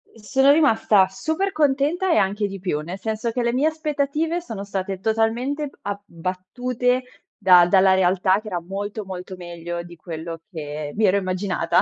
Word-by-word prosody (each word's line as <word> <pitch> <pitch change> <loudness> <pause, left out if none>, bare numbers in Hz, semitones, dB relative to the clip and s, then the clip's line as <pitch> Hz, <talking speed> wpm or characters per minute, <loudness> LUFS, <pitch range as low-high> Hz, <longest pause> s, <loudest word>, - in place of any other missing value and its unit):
Sono 265 +6 +3
rimasta 225 -10 +4
super 315 - -2
contenta 305 +4 +1
e - - +4
anche 200 +1 +1
di 195 -1 -7
più, 180 -5 -1
nel 175 +5 -6
senso 220 +2 -2
che 245 +1 -1
le 235 0 +1
mie 275 +5 +2
aspettative 310 +2 -1
sono 220 - -6
state 195 -1 -4
totalmente 230 +8 0
b 275 - -15
abbattute 205 +7 -2 0.4
da 180 -3 +7
dalla 190 +1 +5
realtà 190 +1 +3
che 215 - -12
era 180 -4 -2
molto 200 +4 -5
molto 185 0 -7
meglio 175 -1 -6
di 175 0 -12
quello 165 0 -7
che 150 -4 -5
mi 215 0 +2
ero 195 +1 +4
immaginata. 185 0 +1
200 Hz, 170 wpm, -23 LUFS, 185-255 Hz, 0.4 s, da